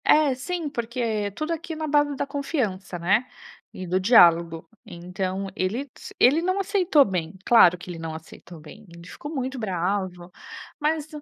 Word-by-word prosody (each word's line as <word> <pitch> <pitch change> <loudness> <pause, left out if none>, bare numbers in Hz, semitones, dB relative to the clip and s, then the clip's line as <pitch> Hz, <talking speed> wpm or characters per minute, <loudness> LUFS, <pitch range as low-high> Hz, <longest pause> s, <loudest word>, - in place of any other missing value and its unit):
É, 300 -3 +4
sim, 325 +5 -4
porque 230 -5 -2
tudo 310 +7 -2
aqui 330 0 -6
é - - -6
na 310 0 -4
base 290 -1 +2
da - - -2
confiança, 245 - -3
né, 195 +8 +1 0.5
e 185 - -7
do 180 +1 0
diálogo. 170 -6 +4 0.2
Então 185 0 -5
ele 230 +10 -2
s - - -11
ele 285 +6 +5
não 370 +3 0
aceitou 375 -7 +3
bem, 180 -1 -4
claro 180 -7 +6
que 180 - -13
ele 165 - -8
não 165 -1 -5
aceitou 160 +1 -12
bem, 155 +8 -14
ele 170 +1 -13
ficou 290 - -9
muito 260 -2 -4
bravo. 185 -2 -3 0.5
"Mas 305 0 -1
215 Hz, 170 wpm, -24 LUFS, 180-290 Hz, 0.5 s, claro